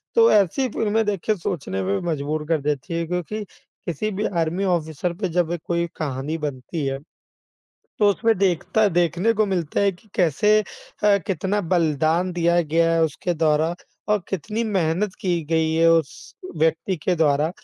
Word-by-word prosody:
तो 460 0 +6
ऐसी 210 +7 +3
फ़िल्में 220 0 0
देखिए 210 +1 0
सोचने 140 - -3
पे 100 +1 0
मजबूर 150 +1 -2
कर 160 -2 +1
देती 145 +4 -2
हैं 165 0 -2
क्योंकि 180 +5 -3 0.4
किसी 180 +6 -2
भी 205 +2 -2 0.2
आर्मी 170 +5 -2 0.2
ऑफिसर 160 +2 -4
पे 190 - 0
जब 175 -1 +1
कोई 170 0 0
कहानी 145 +1 -3
बनती 140 +3 -5
है 135 0 -2 1.0
तो 205 - +5
उसमें 225 +3 +1
देखता 195 +3 +2
देखने 175 +5 +2
को 215 0 +2
मिलता 175 -6 -1
है 200 -1 +3
कि 185 +4 -21
कैसे 210 +6 +3
अ, 205 0 -1
कितना 195 +2 -1
बलिदान 165 0 +1
दिया 170 0 +2
गया 165 +2 +2
है 165 0 +3
उसके 160 +3 -2
द्वारा 160 +1 +2 0.3
और 210 0 +3
कितनी 210 +5 -2
मेहनत 190 -1 0
की 175 -3 0
गई 160 -1 +2
है 165 +1 +4
उस 160 -8 -1 0.2
व्यक्ति 160 +4 +1
के 185 - +2
द्वारा 150 -1 +2
170 Hz, 165 wpm, -23 LUFS, 155-200 Hz, 1.0 s, तो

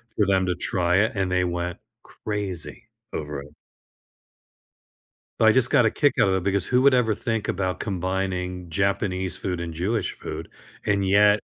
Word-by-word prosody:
for 105 - +3
them 95 -1 +2
to 90 -1 0
try 90 0 +1
it, 110 +3 +3
and 95 -2 -1
they 90 0 +2
went 90 0 -2 0.3
crazy 95 -8 -5 0.2
over 75 -2 -4
it. 75 +2 -15 1.8
But, 110 - +6
I - - +7
just 130 +2 +4
got 125 - +4
a 110 - +3
kick 145 -1 +2
out 95 - +4
of 95 - +2
it, 95 - -1
because 100 -1 +1
who 125 0 +2
would 140 0 +6
ever 120 -3 +3
think 115 0 -2
about 95 -2 -1
combining 90 -2 -3
Japanese 95 0 -1
food 90 -2 -3
and 85 -1 -5
Jewish 100 +8 -1
food? - - -7 0.4
And, 100 -2 +1
yet 105 +1 +5
95 Hz, 175 wpm, -24 LUFS, 90-105 Hz, 1.8 s, I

